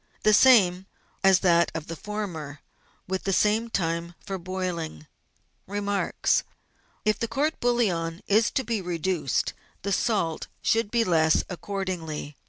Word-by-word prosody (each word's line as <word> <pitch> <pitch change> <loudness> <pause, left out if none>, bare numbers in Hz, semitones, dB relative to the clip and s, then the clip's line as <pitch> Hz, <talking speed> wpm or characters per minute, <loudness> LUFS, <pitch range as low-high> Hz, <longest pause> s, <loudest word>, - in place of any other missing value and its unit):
— - - -32
The 215 - +5
same 195 -6 +5 0.4
as 195 -1 +5
that 170 -2 +4
of 160 -2 -4
the 165 - -6
former, 165 -8 -5 0.5
with 190 0 -2
the 195 - 0
same 215 +4 +2
time 170 -3 -2
for 195 -1 -4
boiling. 175 - -4 0.6
Remarks. 205 0 0 0.3
— - - -38
If 215 0 +2
the 230 - -1
court 295 +6 -1
bouillon 185 -9 0
is 220 +3 +3
to 265 - -1
be 230 -4 -2
reduced, 175 -5 -1 0.3
the 200 - -2
salt 180 -10 0 0.2
should 225 -2 +2
be 235 +1 +2
less 160 -4 +3
accordingly. 175 -6 -4
190 Hz, 145 wpm, -26 LUFS, 165-210 Hz, 0.6 s, The